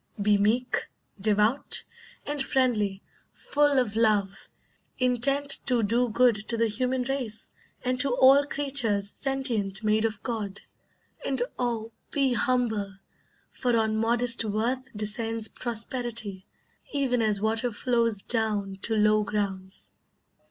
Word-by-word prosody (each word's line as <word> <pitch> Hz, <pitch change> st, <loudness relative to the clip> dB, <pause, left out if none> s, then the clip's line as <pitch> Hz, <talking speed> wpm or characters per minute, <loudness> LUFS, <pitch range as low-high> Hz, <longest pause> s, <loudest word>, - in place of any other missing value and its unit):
Be 205 Hz, +1 st, +3 dB
meek, 240 Hz, +5 st, 0 dB, 0.3 s
devout, 210 Hz, +5 st, +3 dB, 0.4 s
and 290 Hz, -1 st, -3 dB
friendly, 230 Hz, -8 st, 0 dB, 0.3 s
full 290 Hz, -1 st, +1 dB
of 235 Hz, -5 st, +1 dB
love, 205 Hz, -3 st, +1 dB, 0.5 s
Intent 275 Hz, +3 st, +2 dB
to 245 Hz, -3 st, +2 dB
do 235 Hz, +4 st, +1 dB
good 240 Hz, 0 st, +3 dB
to 230 Hz, -, -2 dB
the 230 Hz, -, +2 dB
human 250 Hz, +4 st, -1 dB
race 250 Hz, -5 st, -5 dB, 0.3 s
And 255 Hz, 0 st, 0 dB
to 280 Hz, -, +2 dB
all 270 Hz, +2 st, +6 dB
creatures 245 Hz, -9 st, 0 dB
sentient 235 Hz, -7 st, -2 dB
made 215 Hz, +1 st, +2 dB
of 215 Hz, -2 st, -3 dB
God; 215 Hz, -5 st, -4 dB, 0.6 s
And 265 Hz, -3 st, -1 dB, 0.2 s
oh, 230 Hz, -2 st, -2 dB, 0.2 s
be 275 Hz, -3 st, +1 dB
humble, 225 Hz, -5 st, 0 dB, 0.6 s
for 245 Hz, -2 st, 0 dB
on 220 Hz, -1 st, +1 dB
modest 230 Hz, +1 st, +2 dB
worth 235 Hz, +4 st, -2 dB
Descends 220 Hz, +1 st, -1 dB
prosperity, 230 Hz, -4 st, -3 dB, 0.4 s
even 260 Hz, -4 st, +1 dB
as 215 Hz, -2 st, +2 dB
water 225 Hz, +3 st, 0 dB
flows 230 Hz, -2 st, 0 dB
Down 210 Hz, -4 st, 0 dB
to 225 Hz, -, 0 dB
low 215 Hz, 0 st, +4 dB
grounds." 195 Hz, -2 st, -4 dB
230 Hz, 125 wpm, -27 LUFS, 210-255 Hz, 0.6 s, all